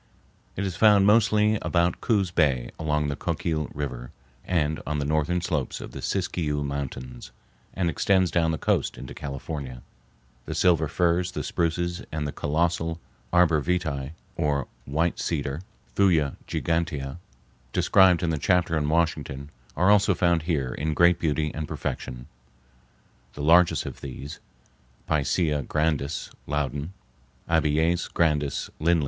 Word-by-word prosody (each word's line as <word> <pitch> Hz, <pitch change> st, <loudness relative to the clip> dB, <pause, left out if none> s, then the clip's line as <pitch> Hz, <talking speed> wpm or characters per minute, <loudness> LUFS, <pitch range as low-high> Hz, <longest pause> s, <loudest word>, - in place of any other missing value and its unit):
It 100 Hz, -, -2 dB
is 95 Hz, -3 st, -3 dB
found 105 Hz, -1 st, +5 dB
mostly 105 Hz, 0 st, +4 dB
about 85 Hz, 0 st, +1 dB
Coos 100 Hz, -6 st, +1 dB
Bay, 70 Hz, -8 st, +1 dB
along 75 Hz, -1 st, 0 dB
the 70 Hz, -, -2 dB
Coquille 75 Hz, 0 st, -2 dB
River, 65 Hz, -4 st, -5 dB, 0.3 s
and 80 Hz, -4 st, 0 dB
on 75 Hz, 0 st, -1 dB
the 70 Hz, -, -1 dB
northern 80 Hz, +4 st, +1 dB
slopes 75 Hz, -7 st, -2 dB
of -, -, -8 dB
the -, -, -8 dB
Siskiyou 80 Hz, -6 st, -1 dB
Mountains, 65 Hz, -3 st, -5 dB, 0.5 s
and 90 Hz, -2 st, 0 dB
extends 95 Hz, +2 st, +2 dB
down 85 Hz, -2 st, +2 dB
the 80 Hz, -, -1 dB
coast -, -, 0 dB
into 65 Hz, -, -8 dB
California. 70 Hz, -2 st, -6 dB, 0.6 s
The -, -, -5 dB
silver 85 Hz, -3 st, +3 dB
firs, 90 Hz, +3 st, +1 dB
the -, -, -3 dB
spruces, 85 Hz, +2 st, -1 dB
and 75 Hz, -1 st, -2 dB
the -, -, -3 dB
colossal 80 Hz, +2 st, -1 dB, 0.3 s
arbor 85 Hz, -3 st, +4 dB
vitæ, 80 Hz, -4 st, -2 dB, 0.2 s
or 70 Hz, -3 st, 0 dB, 0.2 s
white 80 Hz, +5 st, 0 dB
cedar(Thuja 80 Hz, +1 st, -1 dB
gigantea), 80 Hz, -4 st, -2 dB, 0.5 s
described 95 Hz, +2 st, +4 dB
in 85 Hz, -, +1 dB
the 80 Hz, -, -1 dB
chapter 90 Hz, 0 st, +2 dB
on 75 Hz, -1 st, 0 dB
Washington, 75 Hz, -3 st, -1 dB, 0.3 s
are 90 Hz, +3 st, +4 dB
also 100 Hz, -2 st, +4 dB
found 85 Hz, -2 st, +2 dB
here 75 Hz, -6 st, -1 dB
in 75 Hz, +1 st, -2 dB
great 85 Hz, +1 st, +5 dB
beauty 75 Hz, -2 st, 0 dB
and 75 Hz, -1 st, -4 dB
perfection, -, -, -5 dB, 1.1 s
the 75 Hz, -, -6 dB
largest 85 Hz, +3 st, +5 dB
of -, -, -7 dB
these 70 Hz, +3 st, -7 dB, 0.7 s
(Picea 75 Hz, 0 st, +1 dB
grandis, 75 Hz, -1 st, -1 dB, 0.2 s
Loud.; 75 Hz, +1 st, -2 dB, 0.6 s
Abies 80 Hz, +2 st, +2 dB
grandis, 75 Hz, -4 st, 0 dB
Lindl.) 85 Hz, +2 st, +3 dB
80 Hz, 135 wpm, -26 LUFS, 75-85 Hz, 1.1 s, found